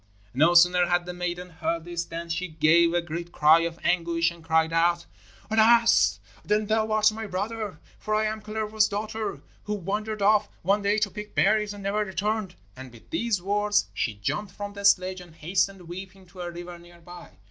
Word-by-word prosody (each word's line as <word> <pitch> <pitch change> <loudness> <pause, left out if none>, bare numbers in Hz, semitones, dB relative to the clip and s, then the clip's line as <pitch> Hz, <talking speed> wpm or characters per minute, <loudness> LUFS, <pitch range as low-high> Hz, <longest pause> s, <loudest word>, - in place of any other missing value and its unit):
No 160 +7 +4
sooner 175 0 +6
had 175 0 +1
the 180 - -6
maiden 180 0 -4
heard 165 0 -3
this 175 -1 -4
than 170 0 -6
she 170 +3 -3
gave 165 +1 +3
a 175 0 0
great 170 +1 -6
cry 155 +1 +5
of 165 0 -3
anguish 170 -1 +1
and 170 -1 -14
cried 160 0 +1
out: 170 +1 +2 0.5
'Alas, 230 +1 +4 0.2
then, 210 +1 +1
thou 220 +1 0
art 215 0 +4
my 220 0 -6
brother! 205 -1 -4 0.2
For 215 0 -2
I 215 0 +1
am 215 0 -3
Kalervo's 215 0 0
daughter, 215 +1 -4 0.2
who 210 - -2
wandered 210 +2 -3
off 210 +1 +3
one 200 +4 +2
day 200 +1 +1
to 210 -2 0
pick 210 +1 -9
berries 210 +1 +2
and 205 -1 -9
never 200 +2 -1
returned,' 205 0 -2 0.2
and 130 -1 -10
with 115 -2 -18
these 230 - -1
words 205 - +1
she 105 +2 -2
jumped 150 - -3
from 205 +1 -6
the 200 0 -6
sledge 185 -1 +3
and 175 -3 -15
hastened 185 +3 -1
weeping 190 +2 -9
to 180 0 -10
a 175 - -4
river 175 0 -9
near 175 0 -17
by. 175 +1 -13
185 Hz, 195 wpm, -26 LUFS, 170-210 Hz, 0.5 s, sooner